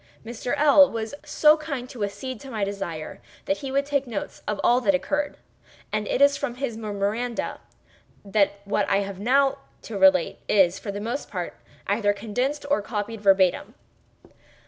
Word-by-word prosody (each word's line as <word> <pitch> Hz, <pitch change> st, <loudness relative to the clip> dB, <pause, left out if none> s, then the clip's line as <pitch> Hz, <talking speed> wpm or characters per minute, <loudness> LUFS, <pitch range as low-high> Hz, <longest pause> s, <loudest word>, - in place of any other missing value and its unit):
Mr. 235 Hz, +2 st, -3 dB
L—l 290 Hz, -1 st, +7 dB
was 225 Hz, +1 st, -4 dB
so 305 Hz, 0 st, +4 dB
kind 285 Hz, -5 st, -4 dB
as -, -, -13 dB
to 230 Hz, -5 st, -5 dB
accede 210 Hz, +5 st, -5 dB
to 270 Hz, -, -10 dB
my 220 Hz, -5 st, -2 dB
desire 195 Hz, -6 st, -5 dB, 0.2 s
that 290 Hz, -, 0 dB
he 275 Hz, -2 st, -6 dB
would 275 Hz, +1 st, +1 dB
take 280 Hz, -2 st, -1 dB
notes 225 Hz, -4 st, -5 dB
of 210 Hz, -, -2 dB
all 245 Hz, +1 st, +4 dB
that 200 Hz, -5 st, +3 dB
occurred, 290 Hz, +10 st, -2 dB, 0.5 s
and 215 Hz, -1 st, -1 dB
it 280 Hz, -, +2 dB
is 280 Hz, 0 st, +5 dB
from 280 Hz, -4 st, -3 dB
his 255 Hz, -3 st, -3 dB
memoranda 215 Hz, +2 st, -3 dB, 0.7 s
that 200 Hz, 0 st, +1 dB
what 205 Hz, 0 st, 0 dB
I 200 Hz, 0 st, +3 dB, 0.2 s
now 270 Hz, +6 st, +4 dB
have 275 Hz, -, -13 dB, 0.3 s
to 210 Hz, -3 st, -5 dB
relate 190 Hz, -3 st, +4 dB
is, 190 Hz, -3 st, +4 dB
for 205 Hz, -, -5 dB
the 200 Hz, -, -5 dB
most 235 Hz, +7 st, -4 dB
part, 180 Hz, -3 st, -4 dB, 0.3 s
either 205 Hz, 0 st, +1 dB
condensed 245 Hz, +8 st, -2 dB
or 285 Hz, -, +3 dB
copied 210 Hz, 0 st, -4 dB
verbatim. 190 Hz, -3 st, +3 dB
220 Hz, 175 wpm, -25 LUFS, 200-270 Hz, 0.7 s, L—l